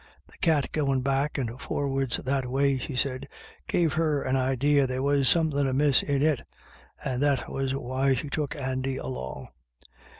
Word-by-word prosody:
" - - -34
The - - -19
cat 155 -5 +2
goin* 135 -4 +1
back 140 +3 0
and 125 -1 -3
for'ards 135 -3 -1
that 135 -1 -1
way," 135 +1 +2
she 130 +2 -5
said, 130 0 -2 0.2
" - - -24
gave 165 -4 +2
her 155 -3 +1
an 130 - 0
idee 135 +2 +2
there 130 -1 0
was 140 -2 +3
somethin* 150 -4 +2
amiss 135 +1 +3
in 140 -1 0
it, 150 -5 +2 0.6
and 130 -1 -1
that 145 -2 +1
was 135 0 -1
why 135 0 +1
she 145 - -4
took 145 0 -2
Andy 130 -1 -2
along. 65 0 -6
135 Hz, 175 wpm, -27 LUFS, 130-145 Hz, 0.6 s, was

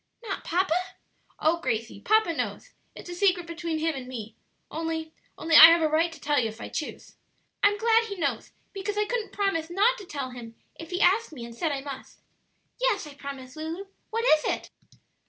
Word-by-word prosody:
"Not 415 -4 -4
papa?" 360 0 +1 0.7
"Oh, 330 +2 +2
Gracie, 225 -8 -3
papa 435 - +3
knows; - - -4 0.2
it's - - -10
a - - -4
secret 360 -1 +2
between 335 -1 -3
him 320 +1 0
and 260 -3 -7
me 230 -4 -7 0.4
only 320 0 -3 0.2
only 325 0 +1
I 320 - +13
have 335 0 +5
a - - +4
right 320 +2 +2
to 320 - -12
tell 290 0 +1
you 225 -3 0
if 220 +1 -11
I - - -7
choose." 305 - -6 0.4
"I'm 410 0 +4
glad 455 +1 +3
he 410 -3 -5
knows, 280 - -2 0.2
because 400 +1 -4
I 420 - +2
couldn't 455 0 -3
promise 390 -6 -1
not 430 +8 +3
to 400 - -9
tell 275 -5 -4
him 235 -2 -10 0.2
if 330 - -10
he 360 +1 -2
asked 420 +2 +3
me 240 -5 -7
and 235 - -10
said 315 +7 -1
I 275 -1 -2
must. 275 -1 -9 0.6
Yes, 465 -8 +1
I 295 - -10
promise, 275 -2 -8
Lulu. 320 +5 -5 0.2
What 460 +1 -1
is 310 -8 +5
it?" - - -2
325 Hz, 205 wpm, -27 LUFS, 280-395 Hz, 0.7 s, I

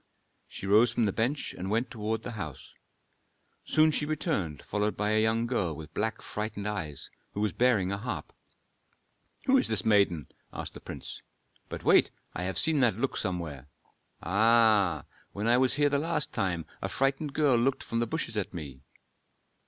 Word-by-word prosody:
She - - -8
rose 110 +4 +5
from 115 - +1
the 100 - +1
bench 120 +8 -1
and 95 +1 -5
went 115 +4 0
toward 110 0 -3
the 125 - -5
house. 80 - -7 0.9
Soon 155 0 +4
she 150 - -1
returned 145 - -2
followed 105 +1 -1
by 105 +1 0
a 110 0 +3
young 110 +1 +2
girl 100 -10 -1
with 80 +1 -10
black, 110 +1 -2
frightened 105 -1 -4
eyes, 85 -9 -4 0.2
who - - -2
was 105 0 +1
bearing 110 -7 +3
a 100 - -2
harp. 120 +3 -5 1.1
"Who 270 0 +5
is - - 0
this 110 -5 -1
maiden?" 100 -7 +3 0.3
asked - - -6
the - - -9
prince. - - -7 0.5
"But - - -6
wait - - +5 0.2
I 90 - -3
have 95 - -2
seen 160 -2 +3
that 120 -5 +3
look 135 +3 -1
somewhere. 80 -7 -3 0.6
Ah! 105 -3 +4 0.3
when 100 +2 -3
I 120 +1 +5
was 130 -1 +2
here 145 0 +3
the 140 0 +1
last 155 -1 0
time 85 -4 -1 0.2
a 95 - -2
frightened 135 +8 0
girl 145 -5 +4
looked 130 +3 +1
from 115 - -2
the 120 - 0
bushes 115 -4 -3
at 100 -2 -2
me." 70 -6 -7
110 Hz, 180 wpm, -29 LUFS, 95-125 Hz, 1.1 s, rose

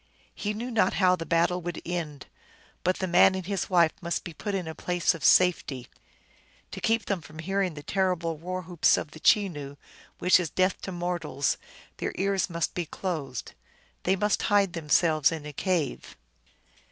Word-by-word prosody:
He 210 0 -3
knew 240 +4 -4
not 215 -5 +2
how 185 -2 +4
the 165 -2 -7
battle 170 +2 +2
would 175 -1 -4
end; 160 -6 -4 0.6
but 185 +1 +2
the 190 - -1
man 185 +1 +5
and 190 -2 -4
his 195 0 -2
wife 170 -4 +4
must 170 -1 -2
be 170 - -7
put 205 +4 -4
in 180 -4 -3
a 160 - -4
place 175 +1 0
of 165 -3 -9
safety. 150 -8 +3 0.8
To - - -7
keep 225 0 +1
from 155 -6 -4
hearing 190 +1 -1
the 145 - -8
terrible 180 -2 0
war 180 +4 -5
whoops 175 -1 +3
of 150 - -5
the 155 - -11
Chenoo, 155 -9 +2 0.4
which 180 +1 +5
is 175 -4 -2
death 185 0 +1
to 190 - -5
mortals, 175 -5 -1 0.4
their - - -3
ears 195 0 0
must 170 -1 -2
be 175 -3 -3
closed. 155 -10 -4 0.5
They 190 - +2
must 205 +1 +1
hide 200 -3 +3
themselves 155 -1 +3
in 160 -2 -5
a 150 - -7
cave. 175 -1 -2
175 Hz, 175 wpm, -27 LUFS, 160-190 Hz, 0.8 s, man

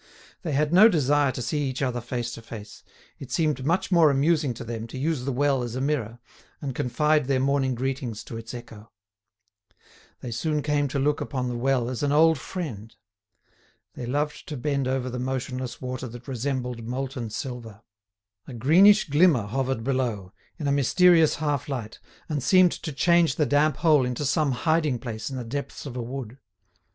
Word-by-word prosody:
They 160 -6 -3
had 150 +3 +1
no 210 +5 +8
desire 145 - +2
to 125 - -5
see 145 +3 -1
each 130 +2 -3
other 125 -2 -1
face 120 0 -4
to 115 - -8
face: 110 -2 -10 0.4
it 135 -2 -9
seemed 150 -3 0
much 170 +7 0
more 170 -4 +6
amusing 145 +1 +2
to 120 - -7
them 115 0 -5
to 115 - -8
use 145 -2 -1
the 135 - -1
well 135 0 +1
as 120 -1 -4
a - - -2
mirror, 130 -5 -1 0.4
and 135 -2 -4
confide 150 +4 +1
their 135 -2 +2
morning 135 -1 +1
greetings 130 -3 -3
to - - -9
its 115 0 -7
echo. 115 -2 -11 1.3
They 120 - -6
soon 150 +6 -1
came 145 -1 +1
to 140 - -3
look 145 +2 +1
upon 130 -3 -2
the 120 - -3
well 125 0 +1
as 125 -1 -4
an 145 -1 +1
old 160 0 +4
friend. 115 - -6 1.0
They 120 - -6
loved 145 +4 -2
to 150 - -5
bend 140 +1 -1
over 130 -1 -1
the 125 0 -4
motionless 130 -1 -4
water 130 0 -5
that 120 0 -11
resembled 125 -2 -3
molten 125 0 -4
silver. 115 -2 -7 0.6
A 130 - -8
greenish 185 - +5
glimmer 145 - +4
hovered 130 +2 -2
below, 115 -8 -2 0.2
in 150 - -3
a - - +2
mysterious 165 +4 +4
half 145 -1 -2
light, 115 -6 -5 0.3
and 150 -3 -2
seemed 180 +7 +5
to 155 - -5
change 170 +1 +3
the 150 - +2
damp 145 +2 +2
hole 155 -5 +4
into 125 +3 -2
some 145 +1 +1
hiding 155 0 +1
place 115 -2 -5
in 135 - -5
the 125 - -4
depths 140 +6 -5
of 135 -3 -7
a 125 - -3
wood. 125 0 -7
135 Hz, 185 wpm, -25 LUFS, 120-150 Hz, 1.3 s, no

